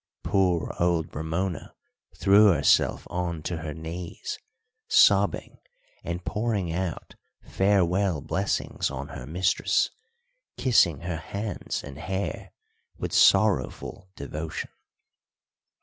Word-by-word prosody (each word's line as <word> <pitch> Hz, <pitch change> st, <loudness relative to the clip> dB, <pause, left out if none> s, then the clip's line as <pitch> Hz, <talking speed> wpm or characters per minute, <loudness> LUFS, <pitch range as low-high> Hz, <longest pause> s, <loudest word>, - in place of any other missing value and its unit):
Poor 90 Hz, -4 st, +1 dB
old 85 Hz, -2 st, 0 dB
Ramona 80 Hz, +3 st, -3 dB, 0.4 s
threw 100 Hz, +2 st, +6 dB
herself 75 Hz, -5 st, +3 dB
on 85 Hz, -3 st, -3 dB
to 85 Hz, +1 st, -3 dB
her 80 Hz, -2 st, -6 dB
knees, 80 Hz, +2 st, -6 dB, 0.5 s
sobbing -, -, +3 dB, 0.4 s
and 85 Hz, +1 st, -5 dB
pouring 105 Hz, -6 st, -1 dB
out 90 Hz, -1 st, -4 dB, 0.3 s
farewell 95 Hz, -3 st, +2 dB
blessings -, -, -1 dB
on -, -, -6 dB
her 60 Hz, -, -8 dB
mistress, 90 Hz, +4 st, +1 dB, 0.7 s
kissing 90 Hz, -, +3 dB
her 85 Hz, -1 st, -3 dB
hands 100 Hz, +5 st, -4 dB
and 70 Hz, 0 st, -9 dB
hair 95 Hz, +5 st, -4 dB, 0.5 s
with -, -, -4 dB
sorrowful 95 Hz, -2 st, +2 dB
devotion. 80 Hz, +3 st, -5 dB
85 Hz, 100 wpm, -26 LUFS, 80-95 Hz, 0.7 s, threw